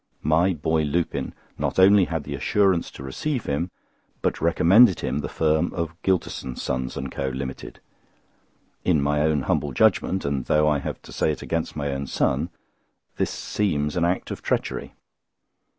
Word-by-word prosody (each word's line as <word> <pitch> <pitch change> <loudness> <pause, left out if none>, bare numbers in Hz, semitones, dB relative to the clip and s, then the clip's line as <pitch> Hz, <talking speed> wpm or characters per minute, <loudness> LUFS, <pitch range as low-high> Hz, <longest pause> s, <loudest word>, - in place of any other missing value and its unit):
My 80 +5 +3
boy 80 0 0
Lupin 80 +3 -1 0.3
not - - -1
only 95 +1 +6
had 80 -3 -3
the - - -6
assurance 95 -4 +2
to - - -11
receive 125 - -3
him, 75 +6 -1 0.5
but - - 0
recommended 90 +5 +5
him 70 +1 -1
the 70 - -4
firm 80 +1 +1
of 85 -2 -2
Gylterson, 85 -8 -1
Sons 65 0 -3
and 70 -1 -4
Co. 70 -1 -2
Limited. 65 -1 -6 1.0
In 85 -5 +3
my 75 +1 +1
own 75 -3 +2
humble 70 +2 0
judgment, 95 +8 +2
and 70 -3 -1
though 75 0 +3
I 75 -1 +2
have - - -5
to - - -12
say - - +1
it 75 - -5
against 80 -1 -2
my 70 -2 -2
own 70 0 -3
son, - - 0 0.7
this - - 0
seems 75 -8 -1
an 85 - +1
act 90 +2 0
of - - -5
treachery. - - -2
75 Hz, 165 wpm, -24 LUFS, 70-85 Hz, 1.0 s, only